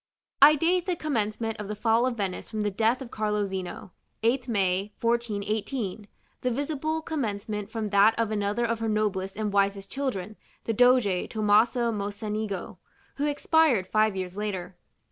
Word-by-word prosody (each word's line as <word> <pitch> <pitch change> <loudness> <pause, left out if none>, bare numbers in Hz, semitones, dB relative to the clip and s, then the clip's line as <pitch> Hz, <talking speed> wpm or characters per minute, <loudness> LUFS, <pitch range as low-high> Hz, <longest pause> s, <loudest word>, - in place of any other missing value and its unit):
I 295 +2 +9
date 350 +4 +1
the 365 - +1
commencement 225 -7 -2
of 210 - -5
the 210 - -4
Fall 225 +3 +2
of 245 -2 -3
Venice 195 -3 -3
from 215 -1 -2
the 205 - 0
death 225 +6 +1
of 240 - -12
Carlo 210 -1 0
Zeno, 190 -1 -6 0.3
8th 245 +3 +1
May, 195 -2 0
1418; 220 -2 -2 0.3
the 250 - 0
visible 305 +4 -2
commencement 210 -8 -3
from 220 -2 -3
that 205 +2 +5
of 225 -2 0
another 210 +2 0
of 230 -1 -1
her 225 -1 -1
noblest 205 -3 -1
and 210 -2 -2
wisest 195 0 +1
children, 215 -7 -3 0.3
the 225 - -1
Doge 245 -5 +3
Tomaso 225 +3 +3
Mocenigo, 205 -2 -4 0.4
who 290 +1 0
expired 290 - +3
five 215 +1 +2
years 185 -1 -4
later. 190 -3 -4
215 Hz, 160 wpm, -27 LUFS, 200-240 Hz, 0.4 s, I